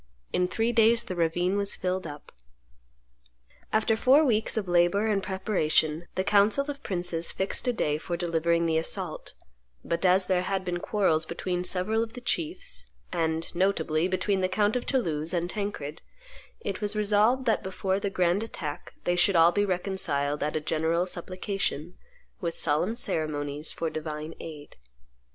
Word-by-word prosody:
In 180 - +2
three 225 +5 0
days 230 0 +4
the 185 - -5
ravine 175 +3 +1
was 200 0 -1
filled 185 -1 -2
up. 145 -1 -10 1.4
After 220 +1 +3
four 270 +7 +5
weeks 225 -3 +1
of 205 -3 -1
labor 175 +4 +3
and 210 -3 +1
preparation, 175 -4 0
the 185 - +1
council 210 +8 +3
of 280 0 -10
princes 175 -3 -1
fixed 190 +6 -2
a - - +4
day 150 -10 0
for 175 +1 -3
delivering 170 -1 +1
the 160 -1 +2
assault; 160 - -3 0.5
but 170 +1 -1
as 185 +1 +4
there 180 -1 +2
had 190 0 -2
been 175 -1 -2
quarrels 175 -6 +2
between 180 +1 -2
several 190 +5 +1
of 225 0 -4
the 250 - -7
chiefs, 150 - -2 0.2
and, 160 0 -1
notably, 170 -3 +1
between 190 +1 0
the 185 0 +1
count 205 +3 +2
of 250 - -2
Toulouse 170 - 0
and 175 0 0
Tancred, 190 -8 -4 0.6
it 195 0 -4
was 210 0 -1
resolved 215 +5 +3
that 225 - +2
before 190 0 -1
the 200 0 -1
grand 180 0 +1
attack 160 -10 -6
they 175 - +1
should 180 +2 +4
all 165 +1 +7
be 205 +3 +1
reconciled 175 -7 -1
at 150 +1 -1
a - - +2
general 160 +3 +1
supplication, 185 -2 -3 0.4
with 170 -5 -3
solemn 165 +8 0
ceremonies, 150 - -2
for 165 -1 -3
divine 155 0 -5
aid. 150 -3 -9
180 Hz, 165 wpm, -28 LUFS, 165-205 Hz, 1.4 s, all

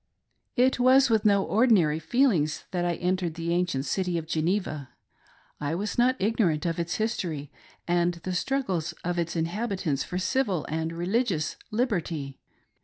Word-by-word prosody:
It 255 0 +3
was 255 0 +5
with 220 -2 +2
no 200 -2 +4
ordinary 200 -10 +3
feelings 180 - +1
that 175 -1 -1
I 175 -1 0
entered 180 -2 -1
the 170 0 -2
ancient 170 -6 0
city 180 -1 -1
of 165 - -3
Geneva. 160 -3 -1 0.7
I 150 +2 -2
was 205 +4 -3
not 250 +2 +3
ignorant 190 -7 +1
of 170 0 -1
its 170 +1 -2
history 175 -10 -2 0.4
and 175 0 +2
the 180 +2 -5
struggles 185 - -1
of 175 0 -1
its 170 0 -2
inhabitants 170 - -1
for 180 - -4
civil 185 - 0
and 160 +1 -2
religious 175 - 0
liberty. 175 - -2
175 Hz, 150 wpm, -27 LUFS, 160-215 Hz, 0.7 s, was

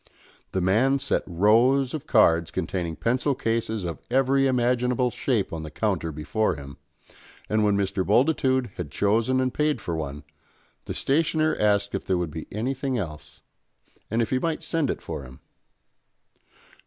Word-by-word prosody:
The 95 - -1
man 115 +10 +3
set 140 +1 0
rows 115 +9 +3
of 155 -1 -5
cards 85 - +4
containing 85 -3 -3
pencil 130 - 0
cases 115 -3 -1
of 85 -4 -5
every 135 +2 +3
imaginable 125 0 +1
shape 115 -10 -1
on 80 - -4
the 80 - -7
counter 85 -1 -1
before 80 +9 -1
him, 70 -1 -10 0.7
and 110 0 +1
when 105 -1 +3
Mr. 95 -1 0
Bultitude 130 - +2
had 85 -5 -4
chosen 110 - +1
and 130 -1 0
paid 150 0 +1
for 85 - -4
one, 75 -2 -5 0.6
the - - -5
stationer 155 +2 +1
asked 100 -1 +2
if 95 - -2
there 95 - 0
would 85 -3 -2
be 80 +1 -7
anything 130 +4 -2
else, 75 -7 -7 0.7
and 115 +2 +1
if 110 - -5
he 130 - +2
might 165 +2 -2
send 160 -5 0
it - - -3
for - - -5
him. 65 -1 -12
110 Hz, 160 wpm, -25 LUFS, 90-130 Hz, 0.7 s, cards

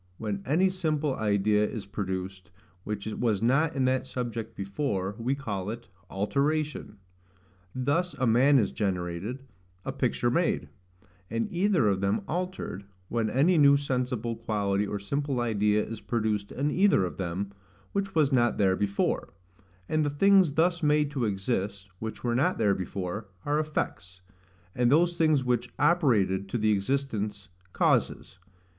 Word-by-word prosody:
When 105 -3 -3
any 165 +7 +3
simple 155 -6 -1
idea 105 0 +2
is 105 -1 -3
produced, 95 -1 -5 0.3
which 105 -1 -4
was 110 -1 0
not 140 +7 +2
in 135 -1 +1
that 130 0 +1
subject 115 -3 -4
before, 100 -1 -2
we 125 +4 0
call 105 -8 -4
it 115 +1 -7 0.2
ALTERATION. 140 +3 -1 0.8
Thus 145 +8 0
a 130 - 0
man 130 +5 +5
is 105 -6 +2
generated, 95 +5 -3 0.4
a - - -2
picture - - 0
made; - - 0 0.6
and 115 +1 -1
either 180 - +2
of 95 -2 +1
them 100 - +1
altered, 180 - -4 0.2
when 115 -2 0
any 155 +9 +3
new 140 -1 +7
sensible 125 -4 -2
quality 105 -3 -1
or 105 - -3
simple 135 +6 -2
idea 105 -2 +1
is 115 -2 -7
produced 105 -3 -1
in 145 +3 -1
either 190 - +4
of 90 - -6
them, 95 +2 -3 0.4
which 195 -2 -2
was 150 -3 +3
not 120 -3 +2
there 95 -2 +3
before: 100 0 -1 0.5
and 155 0 +1
the 145 - +1
things 185 +2 +4
thus 175 +3 +2
made 150 -1 +2
to 135 -5 -1
exist, 100 -1 -2
which 110 0 -6
were 120 -1 0
not 150 +10 +2
there 105 -3 +3
before, 95 +2 -4 0.2
are 145 +1 +1
effects; 90 -12 -3 0.5
and 125 0 +2
those 170 +3 +4
things 155 -5 +3
which 125 -1 0
operated 110 - +2
to 120 - -1
the 110 -1 +2
existence, 105 -2 -2 0.2
causes. 90 - 0
115 Hz, 150 wpm, -28 LUFS, 100-145 Hz, 0.8 s, new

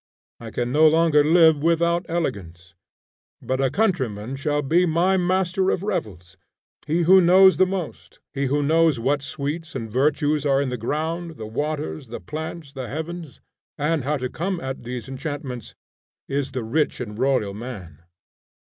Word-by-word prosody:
I 115 - -8
can 120 +2 -2
no 155 +3 +6
longer 160 -1 +4
live 160 -1 +5
without 170 +2 +1
elegance, 95 - -4 0.7
but 130 +1 -2
a 135 - +2
countryman 130 - -1
shall 145 +1 -1
be 175 +6 +3
my 175 +4 +2
master 185 +1 +1
of 185 - -1
revels. 95 - -4 0.5
He 165 +3 +1
who 185 +3 +7
knows 190 +2 +6
the 185 - +4
most; 185 -4 -6
he 140 -1 -1
who 145 +2 +1
knows 160 -2 +3
what 135 +4 0
sweets 145 +4 -5
and 115 -4 -5
virtues 145 +3 +1
are 135 -2 +2
in 140 -2 0
the 125 - -2
ground, 160 +7 -3
the 110 - -6
waters, 125 - -4
the 115 - -7
plants, 155 -1 -7
the 130 -3 -6
heavens, 160 +3 -6 0.4
and 150 0 0
how 150 +3 0
to 130 -1 -3
come 180 +7 -3
at 130 -3 -5
these 120 0 -6
enchantments, 135 -3 -6 0.5
is 140 -1 -2
the 125 - -3
rich 145 +8 0
and 110 -3 -6
royal 130 -7 +1
man. 100 - -8
145 Hz, 165 wpm, -23 LUFS, 125-165 Hz, 0.7 s, who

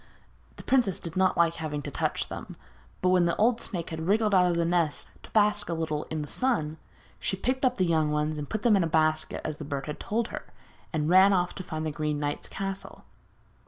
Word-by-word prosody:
The - - -11
princess 240 -9 +2
did 165 -1 -6
not 185 0 +2
like 170 0 +3
having 150 -2 -4
to - - -5
touch - - -1
them, - - -8 0.5
but 180 - +4
when 180 -1 +4
the 170 - +1
old 230 +2 +2
snake 175 -6 -4
had 160 +1 -4
wriggled 210 +1 +2
out 180 -1 +5
of 170 - 0
the 170 - +2
nest 170 -3 0
to - - -14
bask 210 -2 +2
a 170 - -1
little 155 -2 -2
in 155 -1 -3
the - - -7
sun, 160 - 0 0.4
she 190 - -1
picked 260 +6 -1
up 255 -1 +3
the 185 - +2
young 160 -3 +2
ones 150 0 -1
and 145 - -6
put 215 - -3
them 235 -4 +5
in 195 - +3
a - - +1
basket 155 -1 +1
as 155 -1 -3
the 155 - -7
bird 140 -1 -4
had 150 - -6
told 230 +2 -1
her, - - -7 0.4
and 150 -2 -1
ran 190 +3 +6
off 180 -1 +1
to 190 - -7
find 160 -3 -4
the 155 - -1
Green 150 0 -2
Knight's 145 0 -3
castle. 195 0 -6
170 Hz, 235 wpm, -28 LUFS, 155-195 Hz, 0.5 s, ran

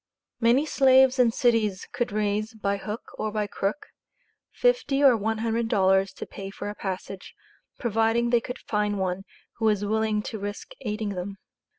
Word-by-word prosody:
Many 245 +5 +4
slaves 265 -2 +5
in 245 -2 +6
cities 225 -6 +1
could 245 -3 -1
raise, 210 +2 -1
"by 200 -2 -1
hook 210 +3 -7
or 215 - -1
by 210 0 -1
crook," 205 +5 -3 0.7
fifty 465 - +1
or 265 -4 +7
one 220 +1 -1
hundred 225 +1 -1
dollars 190 -3 +3
to - - -7
pay 195 -1 -8
for 205 - -6
a - - -7
passage, 190 -1 -6 0.4
providing 230 +1 +1
they 240 -1 +4
could 250 +2 -6
find 210 -1 -1
one 190 0 -2 0.3
who 225 - -1
was 210 -2 +2
willing 215 0 0
to 220 - -5
risk 205 - -6
aiding 215 -2 -3
them. 195 +1 -5
215 Hz, 170 wpm, -26 LUFS, 205-235 Hz, 0.7 s, or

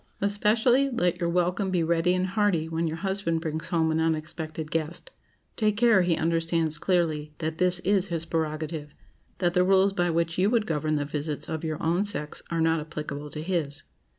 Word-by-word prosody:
Especially, 220 +6 +3
let 180 -8 0
your 170 -1 0
welcome 180 +3 +1
be 180 -3 +1
ready 170 +2 +2
and 185 0 +1
hearty 190 -4 +1
when 165 +1 -1
your 160 +1 -3
husband 190 -3 -1
brings 160 0 -3
home 160 -2 +1
an 160 - +1
unexpected 155 -1 -2
guest. 165 +2 -2 0.4
Take 210 -2 +1
care 225 -4 +5
he 175 -2 +1
understands 165 -1 +1
clearly 155 -5 0
that 160 0 -3
this 180 -1 +3
is 195 0 +2
his 165 -3 -3
prerogative: 155 -2 -3 0.4
that 175 -1 +1
the 180 - +4
rules 195 +1 +4
by 175 -2 +1
which 165 +1 0
you 195 +2 +4
would 230 -2 +2
govern 155 -3 0
the 145 -1 -1
visits 150 0 -4
of 160 -1 -4
your 155 -2 -2
own 170 +4 +2
sex 150 -8 -4
are 170 -1 -1
not 160 0 +3
applicable 150 -1 -6
to 150 +2 -6
his. 160 -5 -1
165 Hz, 190 wpm, -27 LUFS, 155-185 Hz, 0.4 s, care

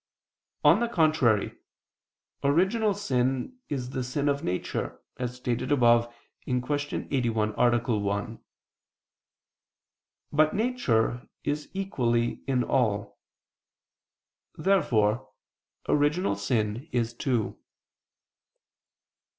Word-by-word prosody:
On - - +6
the 235 - +1
contrary, 155 - +2 0.8
Original 190 +9 +2
sin 135 - -1
is 130 -3 -3
the 130 - -2
sin 140 +4 -1
of 140 0 -1
nature, 90 +1 -3 0.2
as 125 -1 -3
stated 125 +2 -2
above 120 -3 +4 0.3
(Q. 125 -1 0 0.5
81, 115 -5 +1
A. 120 -2 +2
1). 100 +3 -2 1.9
But 155 +1 +3
nature 135 - 0
is 145 +1 -2
equally 120 -12 0
in 130 -2 +2
all. 105 -6 0 1.4
Therefore 110 - +2 0.6
original 150 - +2
sin 105 +5 -1
is 120 -1 0
too. 120 -4 -1
125 Hz, 85 wpm, -27 LUFS, 115-145 Hz, 1.9 s, On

